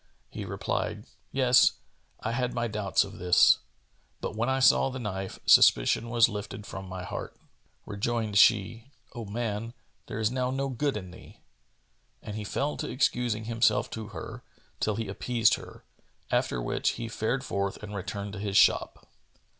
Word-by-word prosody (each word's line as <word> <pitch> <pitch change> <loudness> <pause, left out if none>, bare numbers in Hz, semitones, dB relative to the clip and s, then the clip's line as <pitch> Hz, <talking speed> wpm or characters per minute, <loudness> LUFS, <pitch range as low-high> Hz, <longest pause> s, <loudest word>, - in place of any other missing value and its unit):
He - - -6
replied, - - -3 0.3
"Yes, 130 -2 +5 0.5
I 110 - -2
had 125 +1 -1
my 120 0 0
doubts 105 -3 +1
of 100 +1 -10
this; 90 -1 +5 0.6
but, - - -5
when 115 +3 0
I 130 - +1
saw 135 0 +5
the 130 - -6
knife, 95 -5 -5
suspicion 85 - +5
was 120 -1 +5
lifted 105 -1 -6
from 95 -2 -8
my 90 -1 -6
heart." - - -6 0.5
Rejoined 105 0 -1
she, 115 +3 +3 0.2
"O 120 -3 -6
man, 115 +2 -4 0.3
there - - -5
is 110 0 +1
now 125 0 -1
no 135 +1 -2
good 135 0 -1
in 95 -3 -8
thee!" 90 - -15 0.8
And 105 - -6
he 110 - -4
fell 140 +8 -2
to - - -4
excusing 120 -4 0
himself 115 +1 +1
to 110 -2 -6
her, 95 -7 -8 0.4
till 110 - 0
he 115 -1 -3
appeased 115 +3 +2
her; - - -6 0.5
after - - +1
which - - 0
he 115 0 -5
fared 120 +4 -2
forth 100 -5 -2
and 105 0 -7
returned 100 +1 -5
to 100 - -6
his 100 -1 0
shop. - - +3
110 Hz, 165 wpm, -28 LUFS, 100-120 Hz, 0.8 s, Yes